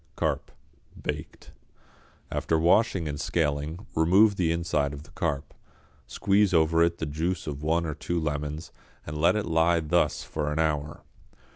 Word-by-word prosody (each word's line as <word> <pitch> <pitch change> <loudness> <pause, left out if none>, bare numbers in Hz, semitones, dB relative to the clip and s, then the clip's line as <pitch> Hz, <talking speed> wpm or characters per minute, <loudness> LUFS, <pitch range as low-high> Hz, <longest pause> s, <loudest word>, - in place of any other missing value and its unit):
=Carp, - - -1 0.5
Baked.= - - -6 0.8
After 80 - 0
washing 85 +1 +3
and 75 -1 -4
scaling, 75 +4 -1
remove 95 +6 +5
the 85 -4 +1
inside 80 -4 0
of 70 0 -8
the - - -18
carp, 70 -1 -3 0.5
squeeze 100 -1 +2
over 80 +1 +4
it 85 0 +2
the - - -3
juice 80 +5 -2
of 70 -2 -5
one 80 +2 +1
or 80 - -2
two 85 +4 -2
lemons 75 0 -3 0.3
and 75 - -6
let 85 +4 +4
it 105 - -1
lie 85 +1 +3
thus 75 -2 +1
for 75 -1 -3
an 75 - -2
hour. 75 -2 -1
80 Hz, 155 wpm, -27 LUFS, 75-85 Hz, 0.8 s, remove